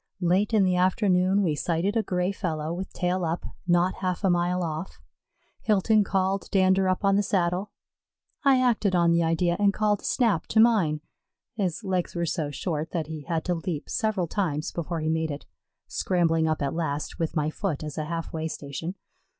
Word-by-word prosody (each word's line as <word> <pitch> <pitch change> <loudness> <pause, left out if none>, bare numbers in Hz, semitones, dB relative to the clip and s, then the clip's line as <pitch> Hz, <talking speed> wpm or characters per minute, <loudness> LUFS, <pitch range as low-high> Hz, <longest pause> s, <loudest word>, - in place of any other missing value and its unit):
Late 185 +5 +2
in 215 -3 +4
the 185 -1 +2
afternoon 185 +1 +3
we 165 -5 +1
sighted 170 +7 -1
a 225 - +3
gray 180 -2 -1
fellow 160 -5 -3
with 185 +2 -5
tail 180 0 -1
up, 165 +1 -2 0.2
not 175 +1 +2
half 185 -1 -2
a 190 - +4
mile 175 +1 +1
off. 160 +2 -5 0.6
Hilton 215 0 +3
called 195 0 -1
Dander 190 0 +3
up 185 +2 0
on 195 0 +4
the - - +4
saddle. 185 0 0 0.7
I 270 -2 +5
acted 220 -6 +2
on 170 -1 +4
the 170 0 +3
idea 170 +1 +1
and 200 -1 +4
called 210 -1 +1
Snap 225 -10 +1
to 220 - +2
mine. 195 -10 +4 0.5
His 200 -2 -2
legs 185 -3 -1
were 170 0 0
so 160 -3 -2
short 155 +2 -3
that 165 -3 -1
he 155 -2 -7
had 160 +2 -2
to 180 - +1
leap 165 -3 -4
several 215 -5 0
times 165 -4 -2
before 170 -1 -3
he 155 - -1
made 160 0 0
it, 145 0 -6 0.4
scrambling 165 -3 +1
up 155 -2 0
at 140 - -1
last 160 -3 -3
with 165 0 -2
my 155 -1 0
foot 160 -5 -3
as 150 -2 -6
a 155 - -2
half 165 +1 -4
way 160 0 -2
station. 160 +4 -5
180 Hz, 190 wpm, -26 LUFS, 160-195 Hz, 0.7 s, I